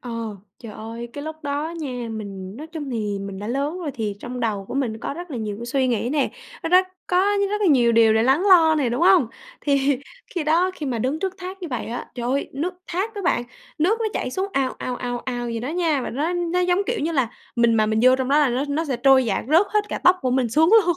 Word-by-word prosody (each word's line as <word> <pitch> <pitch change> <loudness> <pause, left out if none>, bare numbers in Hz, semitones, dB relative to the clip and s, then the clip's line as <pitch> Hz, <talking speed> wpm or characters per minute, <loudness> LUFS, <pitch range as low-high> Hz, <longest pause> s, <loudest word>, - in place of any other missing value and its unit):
Ờ, 245 - -7 0.5
trời 225 -3 -9
ơi, 230 +3 -7
cái 285 +2 -6
lúc 315 0 -5
đó 295 +3 -2
nha, 250 -5 -4
mình 200 -3 -7
nói 300 +4 -7
chung 315 -4 -6
thì 210 -4 -2
mình 195 -1 -6
đã 205 - -6
lớn 280 +8 -2
rồi 335 -5 -3
thì 215 -3 -2
trong 245 0 -6
đầu 210 -4 -1
của - - -5
mình 245 -5 -1
có 260 - -4
rất 350 +2 -8
là 265 - -4
nhiều 215 -3 -3
cái 235 - -6
suy 260 +2 +1
nghĩ 235 -1 0
nè, 290 -1 +1 0.3
nó - - -2
rất 365 +2 +5 0.2
có 360 - 0 0.3
rất 420 0 -1
là 410 - +2
nhiều 245 -7 +4
điều 225 -1 +5
để 220 - +3
lắng 265 +8 +3
lo 330 -4 +7
nè, 285 -5 +1
đúng 240 +4 -2
hông? 360 -7 +6 0.3
Thì 280 -2 +2 0.4
khi 345 -4 -1
đó, 335 +4 +3
khi 300 - -5
mà 245 -3 -1
đứng 260 +7 -1
trước 380 +1 -2
thác 370 +1 -7
như 350 - -4
vậy 250 -5 -3
á, 235 +2 -6
trời 240 -1 -4
ơi, 275 +2 0
nước 330 +7 -3
thác 390 +6 -2
á 405 - -5
bạn, 345 -8 +1 0.4
nước 390 +9 +2
nó 450 - +1
chảy - - -2
xuống 380 +8 -2
ào, 270 -4 0
ào, 250 - -3
ào, 245 -1 -3
ào 245 -2 -4
vậy 230 -1 -3
đó 250 - -4
nha, 325 -3 +1
và - - -4
nó 300 +8 -1
nó 350 0 0
giống, 360 0 +2
kiểu 475 -2 -1
như 320 +3 -1
là, 265 -7 +1 0.3
mình 235 -1 +4
mà 215 -1 +3
mình 220 0 +1
vô 255 +1 +6
trong 260 -1 -2
đó 285 +2 +4
là 295 -2 +4
nó 250 +3 0
nó 300 +3 0
sẽ 275 -5 -2
trôi 260 +1 +5
dạt 215 -4 -1
rớt 330 +7 +5
hết 425 -1 +2
cả - - -3
tóc 360 +1 +7
của 255 - +1
mình 255 -1 +1
xuống 315 +9 +4
luôn. 350 0 +1
275 Hz, 275 wpm, -23 LUFS, 235-330 Hz, 0.5 s, lo